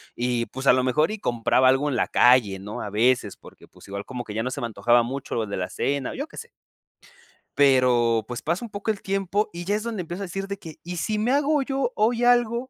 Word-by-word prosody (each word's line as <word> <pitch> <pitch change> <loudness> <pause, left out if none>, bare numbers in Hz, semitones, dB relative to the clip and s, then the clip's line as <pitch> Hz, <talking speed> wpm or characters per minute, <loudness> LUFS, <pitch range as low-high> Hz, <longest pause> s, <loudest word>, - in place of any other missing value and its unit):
y, 120 -1 -1
pues, 135 +1 -6
a - - +8
lo 130 0 +1
mejor, 150 +8 +2
y 215 - -5
compraba 120 - +2
algo 135 +3 +3
en 130 - -1
la - - +1
calle, 120 -6 +4
¿no?, 105 +2 -7
a 105 - -5
veces, 120 +4 +1
porque, - - -16
pues, - - -17
igual 100 +1 -5
como 125 -2 -6
que 105 -2 -8
ya 110 - -1
no 130 - -3
se - - -5
me 120 - -1
antojaba 120 +2 +3
mucho 130 +3 -5
lo 115 -2 0
de 100 - -4
la 90 -1 -2
cena, 140 +4 -2
yo 285 +3 -4
qué - - -15
sé. 470 +1 -8 1.1
Pero, 125 -5 +3
pues, 120 -1 -5
pasa 175 +9 -2
un - - -10
poco 205 +1 -2
el 205 - -6
tiempo 195 +2 -1
y 175 - -6
ya 200 +4 0
es 215 - -3
donde 230 -5 -3
empiezo 175 +3 -6
a - - -3
decir 195 +2 -5
de 200 0 -5
que: 160 -5 -10
"¿Y 175 +1 -6
si 210 +7 -1
me 225 +4 0
hago 290 +1 +2
yo 270 -2 -1
hoy 230 +3 +1
algo?" 240 -1 +3
145 Hz, 260 wpm, -24 LUFS, -, 1.1 s, a